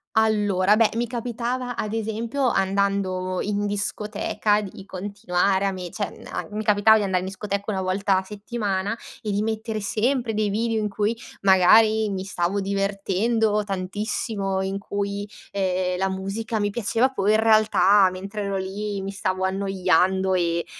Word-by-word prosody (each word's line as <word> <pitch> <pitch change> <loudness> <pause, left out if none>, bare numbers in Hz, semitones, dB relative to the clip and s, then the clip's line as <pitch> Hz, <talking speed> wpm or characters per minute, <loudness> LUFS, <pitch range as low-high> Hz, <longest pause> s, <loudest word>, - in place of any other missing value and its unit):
Allora, 210 -3 +3
beh 220 -1 +4
mi 235 +1 0
capitava 245 +1 -3
ad 215 0 -3
esempio 225 +4 -1
andando 190 -2 0
in 205 0 -1
discoteca 205 +1 -1
di 195 -2 -8
continuare 195 0 -1
a 195 - +1
me 180 -2 -6
cioè 205 +3 -5
am - - -5
mi 215 +1 -3
capitava 210 +1 +5
di 210 - 0
andare 190 -2 0
in 185 - -5
discoteca 200 +1 -3
una 195 - -2
volta 190 +1 +1
a 190 - -1
settimana 205 -1 -3 0.3
e 210 - -3
di 200 +1 0
mettere 220 0 -2
sempre 235 +3 0
dei 210 -1 0
video 225 +2 0
in 210 - -1
cui 210 +3 -1 0.3
magari 215 +3 +5
mi 190 -1 -3
stavo 190 +1 -1
divertendo 200 +2 0
tantissimo 195 0 -2
in 195 +1 -3
cui, 200 0 -3 0.3
ehm, 185 -2 0
la 190 +1 0
musica 195 +4 -3
mi 205 0 0
piaceva 235 +3 +1
poi 210 -6 +1
in - - +3
realtà 215 -3 +5
mentre 195 +3 -6
ero 200 -1 -2
lì 200 +1 -4
mi 195 +1 -4
stavo 190 -1 -1
annoiando 190 -1 +1
e 170 -2 0
200 Hz, 160 wpm, -24 LUFS, 190-215 Hz, 0.3 s, capitava